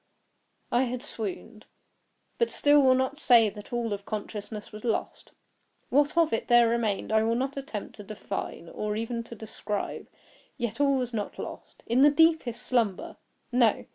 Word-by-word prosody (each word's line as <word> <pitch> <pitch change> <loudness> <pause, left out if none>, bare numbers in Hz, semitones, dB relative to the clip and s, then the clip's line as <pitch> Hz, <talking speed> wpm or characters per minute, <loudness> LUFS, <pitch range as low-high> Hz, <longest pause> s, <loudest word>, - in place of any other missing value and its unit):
I 245 +2 +3
had 250 +1 -4
swooned; 220 -3 -6 0.7
but 470 - +2
still 290 0 +4
will 260 -1 +5
not 260 +3 -1
say 230 -6 +5
that 210 0 -11
all 235 -3 -1
of 200 0 -5
consciousness 210 0 -6
was 215 0 -10
lost. 230 -3 -3 0.6
What 290 +4 +2
of 330 -2 +4
it 225 - -1
there 240 -1 +6
remained 225 -4 -1
I 220 0 +4
will 225 +1 +1
not 265 +3 -2
attempt 265 -8 -6
to 205 - -9
define, 200 -4 -6
or 210 0 -3
even 230 +2 -2
to 235 - -9
describe; 210 -1 -5 0.5
yet 235 0 -3
all 280 -1 +4
was 250 -2 -3
not 210 -2 -3
lost. - - -9
In 240 +3 +2
the 290 - +8
deepest 315 -5 +2
slumber—no! 235 +1 0
235 Hz, 165 wpm, -28 LUFS, 215-260 Hz, 0.7 s, the